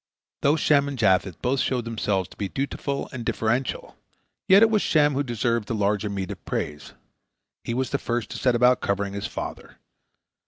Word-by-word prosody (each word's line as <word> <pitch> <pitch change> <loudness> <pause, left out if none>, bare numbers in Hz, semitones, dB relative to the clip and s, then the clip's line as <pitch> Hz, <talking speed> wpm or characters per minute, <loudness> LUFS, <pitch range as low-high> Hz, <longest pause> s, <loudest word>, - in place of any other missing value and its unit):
Though 145 +2 +4
Shem 145 -2 +3
and 140 -1 -4
Japheth 95 -4 +2
both 130 +2 +1
showed 125 -2 0
themselves 105 -5 -1
to - - -15
be 100 -2 -3
dutiful 140 +2 -3
and 125 -2 -5
deferential, 120 +3 -2 0.5
yet 195 +3 +7
it 225 - +5
was 215 -2 +3
Shem 150 -2 +3
who 135 - 0
deserved 120 -3 -1
the 115 - -2
larger 105 0 0
meed 95 -2 -4
of - - -9
praise. 75 0 -4 0.7
He 115 - -3
was 130 +1 -1
the 140 - 0
first 120 -1 -3
to - - -5
set 125 -2 +2
about 125 +1 +4
covering 100 0 -1
his 100 - -3
father. - - -7
120 Hz, 190 wpm, -25 LUFS, 100-140 Hz, 0.7 s, yet